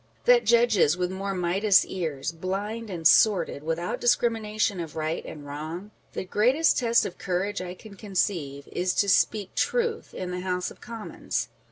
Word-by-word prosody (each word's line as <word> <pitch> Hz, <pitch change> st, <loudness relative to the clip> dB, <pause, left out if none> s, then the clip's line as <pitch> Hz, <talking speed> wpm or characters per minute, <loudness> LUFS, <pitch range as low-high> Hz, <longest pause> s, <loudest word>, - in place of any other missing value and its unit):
â€" -, -, -36 dB
that -, -, +5 dB
judges 230 Hz, -9 st, +4 dB
with 180 Hz, 0 st, -1 dB
more 195 Hz, +1 st, -3 dB
Midas 185 Hz, +3 st, +3 dB
ears, 160 Hz, -5 st, -3 dB
blind 200 Hz, +6 st, -4 dB
and 165 Hz, -4 st, +2 dB
sordid, 180 Hz, -9 st, +4 dB
without 165 Hz, +3 st, -3 dB
discrimination 220 Hz, -4 st, +1 dB
of 165 Hz, -3 st, -6 dB
right 155 Hz, +1 st, -2 dB
and 145 Hz, -2 st, -9 dB
wrong? 160 Hz, +8 st, -6 dB, 0.2 s
The -, -, -4 dB
greatest 250 Hz, -, +3 dB
test 235 Hz, -1 st, +3 dB
of -, -, -7 dB
courage 190 Hz, +2 st, -2 dB
I 180 Hz, 0 st, -6 dB
can 215 Hz, +2 st, -13 dB
conceive, 175 Hz, -8 st, -2 dB
is 180 Hz, +1 st, -1 dB
to 200 Hz, -, +2 dB
speak 200 Hz, 0 st, +2 dB
truth 465 Hz, -2 st, -1 dB
in 180 Hz, -1 st, -4 dB
the 180 Hz, -, -3 dB
House 180 Hz, 0 st, -2 dB
of -, -, -16 dB
Commons. 230 Hz, -2 st, -4 dB
190 Hz, 170 wpm, -26 LUFS, 170-215 Hz, 0.2 s, that